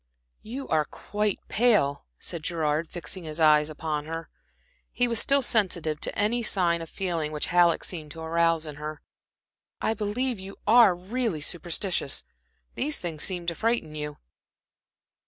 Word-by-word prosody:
"You 265 Hz, +5 st, -6 dB
are 155 Hz, -1 st, +2 dB
quite 210 Hz, +3 st, -2 dB
pale," 205 Hz, -, +2 dB
said 170 Hz, -, -5 dB
Gerard, 155 Hz, -1 st, 0 dB
fixing 175 Hz, +2 st, -6 dB
his 155 Hz, 0 st, -6 dB
eyes 150 Hz, -1 st, +5 dB
upon 155 Hz, -1 st, -3 dB
her. 165 Hz, +1 st, -5 dB, 0.6 s
He 245 Hz, -, +1 dB
was 230 Hz, -1 st, +2 dB
still 275 Hz, 0 st, +4 dB
sensitive 175 Hz, -10 st, +1 dB
to -, -, -2 dB
any 215 Hz, +4 st, +2 dB
sign 175 Hz, -6 st, +2 dB
of 165 Hz, -, -7 dB
feeling 170 Hz, -5 st, -2 dB
which 150 Hz, -1 st, -1 dB
Halleck 175 Hz, -1 st, +4 dB
seemed 160 Hz, -4 st, -4 dB
to 165 Hz, -, -9 dB
arouse 165 Hz, 0 st, +2 dB
in 150 Hz, -1 st, -7 dB
her. 150 Hz, +1 st, -6 dB, 0.8 s
"I 220 Hz, -, +1 dB
believe 225 Hz, +3 st, -1 dB
you 195 Hz, +1 st, -9 dB
are 225 Hz, -5 st, +7 dB
really 195 Hz, -1 st, -2 dB
superstitious. 175 Hz, -1 st, -1 dB, 0.5 s
These 295 Hz, +2 st, 0 dB
things 165 Hz, -4 st, -4 dB
seem 180 Hz, -3 st, -1 dB
to 170 Hz, -, 0 dB
frighten 225 Hz, -5 st, 0 dB
you." 150 Hz, -1 st, -5 dB
170 Hz, 155 wpm, -27 LUFS, 155-210 Hz, 0.8 s, are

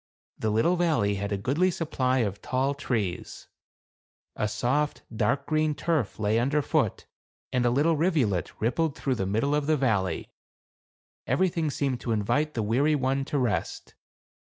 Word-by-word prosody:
The 110 Hz, -, 0 dB
little 115 Hz, +12 st, +2 dB
valley 150 Hz, -13 st, +2 dB
had 100 Hz, 0 st, -3 dB
a 100 Hz, -, 0 dB
goodly 140 Hz, -, +1 dB
supply 130 Hz, -7 st, 0 dB
of 100 Hz, 0 st, -5 dB
tall 130 Hz, +2 st, 0 dB
trees; 115 Hz, -10 st, -3 dB, 0.9 s
a 105 Hz, -, 0 dB
soft, 140 Hz, +7 st, -1 dB
dark 140 Hz, +5 st, +1 dB
green 155 Hz, -1 st, +1 dB
turf 155 Hz, -, -1 dB
lay 110 Hz, +1 st, +1 dB
under 140 Hz, +5 st, +1 dB
foot, -, -, 0 dB, 0.5 s
and 125 Hz, -1 st, +2 dB
a -, -, +4 dB
little 145 Hz, +7 st, +3 dB
rivulet 145 Hz, -, +1 dB
rippled 145 Hz, +7 st, 0 dB
through 135 Hz, -, 0 dB
the 95 Hz, -6 st, -2 dB
middle 115 Hz, +9 st, +1 dB
of 150 Hz, -1 st, 0 dB
the 155 Hz, -1 st, +3 dB
valley; 100 Hz, -, 0 dB, 1.0 s
everything 170 Hz, -4 st, +1 dB
seemed 135 Hz, -3 st, -1 dB
to 115 Hz, -, -1 dB
invite 145 Hz, +9 st, 0 dB
the 115 Hz, -, 0 dB
weary 135 Hz, +8 st, +2 dB
one 135 Hz, 0 st, 0 dB
to 145 Hz, -, -2 dB
rest. 105 Hz, -10 st, -2 dB
130 Hz, 155 wpm, -27 LUFS, 110-150 Hz, 1.0 s, a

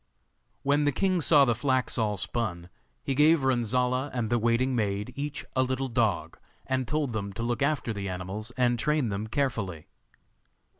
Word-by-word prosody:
When 145 Hz, +1 st, +2 dB
the 145 Hz, -, +3 dB
king 185 Hz, +4 st, +1 dB
saw 145 Hz, -2 st, +6 dB
the 120 Hz, -, +2 dB
flax 130 Hz, +2 st, 0 dB
all 105 Hz, -3 st, 0 dB
spun, 90 Hz, -4 st, -2 dB, 0.3 s
he 135 Hz, -, -1 dB
gave 150 Hz, +2 st, +4 dB
Renzolla 125 Hz, +1 st, +1 dB
and 115 Hz, -2 st, -1 dB
the 120 Hz, -, +3 dB
waiting 120 Hz, +3 st, +1 dB
maid 105 Hz, -2 st, -1 dB
each 145 Hz, +1 st, -4 dB
a 130 Hz, -, +3 dB
little 130 Hz, +1 st, -1 dB
dog, 115 Hz, -5 st, 0 dB, 0.3 s
and 130 Hz, -2 st, -1 dB
told 150 Hz, -5 st, -1 dB
them 100 Hz, -2 st, -3 dB
to 115 Hz, -, -4 dB
look 120 Hz, +2 st, -1 dB
after 140 Hz, -5 st, 0 dB
the 100 Hz, -2 st, -4 dB
animals 95 Hz, +5 st, -5 dB
and 120 Hz, -2 st, +2 dB
train 150 Hz, -3 st, +1 dB
them 100 Hz, +2 st, -3 dB
carefully. 110 Hz, -, -2 dB
120 Hz, 170 wpm, -28 LUFS, 110-135 Hz, 0.3 s, saw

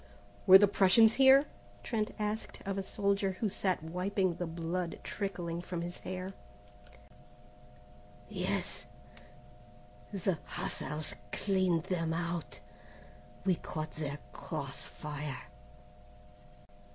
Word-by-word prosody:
"Were 190 Hz, -, +12 dB
the 205 Hz, +1 st, +6 dB
Prussians 205 Hz, +3 st, +6 dB
here?" 270 Hz, +1 st, +7 dB, 0.4 s
Trent 220 Hz, -3 st, -1 dB
asked 215 Hz, +1 st, -3 dB
of 195 Hz, 0 st, -1 dB
a 195 Hz, -, -1 dB
soldier 200 Hz, 0 st, 0 dB
who 200 Hz, +4 st, -1 dB
sat 185 Hz, -4 st, 0 dB
wiping 180 Hz, +2 st, 0 dB
the 175 Hz, +1 st, -3 dB
blood 165 Hz, +1 st, -3 dB
trickling 175 Hz, -4 st, -3 dB
from 175 Hz, -1 st, -4 dB
his 175 Hz, +1 st, -5 dB
hair. 185 Hz, +1 st, -5 dB, 1.9 s
"Yes. -, -, -2 dB, 1.2 s
The 190 Hz, -4 st, 0 dB
hussars 155 Hz, -5 st, -3 dB, 0.2 s
cleaned 185 Hz, -4 st, +2 dB
them 165 Hz, -3 st, -1 dB
out. 165 Hz, -10 st, -3 dB, 0.9 s
We 190 Hz, -, +5 dB
caught 155 Hz, -2 st, -4 dB
their 145 Hz, -2 st, -4 dB, 0.2 s
cross 140 Hz, -4 st, -4 dB
fire." 150 Hz, -2 st, -5 dB
180 Hz, 105 wpm, -33 LUFS, 165-195 Hz, 1.9 s, Were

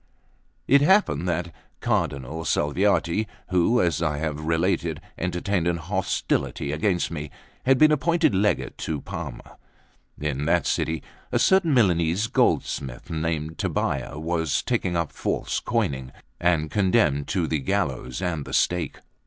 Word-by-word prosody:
LX 135 Hz, -, +5 dB
IT -, -, +1 dB
happened 145 Hz, -, +3 dB
that 85 Hz, 0 st, -2 dB, 0.3 s
Cardinal 70 Hz, +5 st, -1 dB
Salviati, 90 Hz, +6 st, +1 dB, 0.2 s
who, 90 Hz, +7 st, +3 dB
as 85 Hz, -3 st, +1 dB
I 75 Hz, -3 st, 0 dB
have 75 Hz, -1 st, -2 dB
related, 80 Hz, 0 st, 0 dB, 0.2 s
entertained 90 Hz, 0 st, -1 dB
an 85 Hz, -1 st, +1 dB
old 80 Hz, -, -10 dB
hostility 95 Hz, -6 st, -1 dB
against 85 Hz, +4 st, 0 dB
me, 75 Hz, -2 st, -5 dB, 0.4 s
had 135 Hz, 0 st, +6 dB
been 155 Hz, +3 st, +6 dB
appointed 165 Hz, -1 st, +2 dB
Legate 100 Hz, +2 st, 0 dB
to 75 Hz, -2 st, -2 dB
Parma. -, -, -8 dB, 0.6 s
In 75 Hz, -1 st, -2 dB
that 85 Hz, +1 st, +2 dB
city 80 Hz, -1 st, -1 dB, 0.3 s
a -, -, +2 dB
certain 190 Hz, -6 st, +4 dB
Milanese 90 Hz, -3 st, +3 dB
goldsmith, 80 Hz, -, 0 dB
named 80 Hz, -1 st, -2 dB
Tobbia, 70 Hz, +2 st, -1 dB
was 80 Hz, -1 st, -1 dB
taken 85 Hz, -, 0 dB
up 85 Hz, -2 st, -1 dB
for -, -, -2 dB
false -, -, -2 dB
coining, 65 Hz, -2 st, -1 dB, 0.3 s
and 80 Hz, -3 st, +1 dB
condemned 95 Hz, -7 st, +2 dB
to 90 Hz, -4 st, 0 dB
the 80 Hz, -1 st, -1 dB
gallows 65 Hz, 0 st, -2 dB
and 80 Hz, -5 st, -1 dB
the -, -, -9 dB
stake. 85 Hz, -5 st, +1 dB
85 Hz, 145 wpm, -25 LUFS, 75-95 Hz, 0.6 s, had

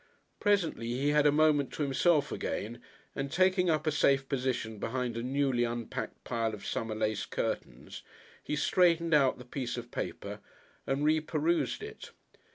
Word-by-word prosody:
Presently 190 Hz, -, +1 dB
he 130 Hz, +4 st, 0 dB
had 150 Hz, 0 st, +4 dB
a -, -, +5 dB
moment 150 Hz, -2 st, +3 dB
to 150 Hz, -, -2 dB
himself 145 Hz, +2 st, +2 dB
again, 115 Hz, +3 st, -4 dB, 0.3 s
and, 135 Hz, 0 st, -3 dB
taking 185 Hz, -1 st, +3 dB
up 155 Hz, -1 st, +1 dB
a 155 Hz, -, +2 dB
safe 135 Hz, -2 st, +3 dB
position 125 Hz, -5 st, -2 dB
behind 125 Hz, +1 st, -2 dB
a 115 Hz, -, -2 dB
newly 130 Hz, -1 st, +1 dB
unpacked 120 Hz, -1 st, -4 dB
pile 115 Hz, -2 st, -1 dB
of 105 Hz, -, -12 dB
summer 115 Hz, -1 st, -2 dB
lace 110 Hz, -1 st, -1 dB
curtains, -, -, -4 dB, 0.4 s
he 150 Hz, -, -2 dB
straightened 170 Hz, +1 st, +3 dB
out 140 Hz, -3 st, +4 dB
the 125 Hz, -, -11 dB
piece 125 Hz, -1 st, -4 dB
of 120 Hz, 0 st, -7 dB
paper -, -, -5 dB, 0.5 s
and 135 Hz, +2 st, 0 dB
reperused 155 Hz, -, +1 dB
it. 435 Hz, +1 st, -9 dB
140 Hz, 160 wpm, -31 LUFS, 120-155 Hz, 0.5 s, a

